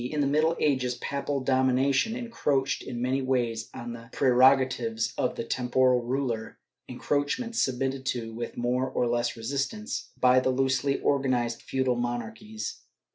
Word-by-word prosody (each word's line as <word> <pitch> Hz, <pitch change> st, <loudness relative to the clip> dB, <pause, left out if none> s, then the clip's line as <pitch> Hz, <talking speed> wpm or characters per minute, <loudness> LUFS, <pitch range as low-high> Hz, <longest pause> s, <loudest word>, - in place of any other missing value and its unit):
In 150 Hz, +5 st, -3 dB
the 145 Hz, -, +3 dB
middle 155 Hz, +4 st, +2 dB
ages 130 Hz, -4 st, +1 dB
papal 140 Hz, +1 st, -3 dB
domination 130 Hz, -, +2 dB
encroached 145 Hz, -, -1 dB
in 120 Hz, -2 st, -5 dB
many 130 Hz, +2 st, +1 dB
ways 120 Hz, -4 st, -1 dB
on 120 Hz, 0 st, -7 dB
the 115 Hz, 0 st, -11 dB
preroga 130 Hz, 0 st, +5 dB
tives 115 Hz, -3 st, -3 dB
of -, -, -1 dB
the -, -, -3 dB
temporal 125 Hz, +1 st, +2 dB
ruler, 120 Hz, -2 st, -2 dB, 0.3 s
encroachments 190 Hz, -, -1 dB
submitted 135 Hz, +1 st, -1 dB
to, 115 Hz, -3 st, -2 dB
with 120 Hz, +1 st, -6 dB
more 125 Hz, +2 st, 0 dB
or -, -, 0 dB
less 120 Hz, 0 st, 0 dB
resistance, 140 Hz, -, -3 dB
by 125 Hz, 0 st, +5 dB
the 130 Hz, -, 0 dB
loosely 130 Hz, +1 st, +1 dB
organized 125 Hz, -4 st, 0 dB
feudal 130 Hz, -2 st, 0 dB
monarchies. 120 Hz, -, -4 dB
130 Hz, 145 wpm, -27 LUFS, 120-140 Hz, 0.3 s, preroga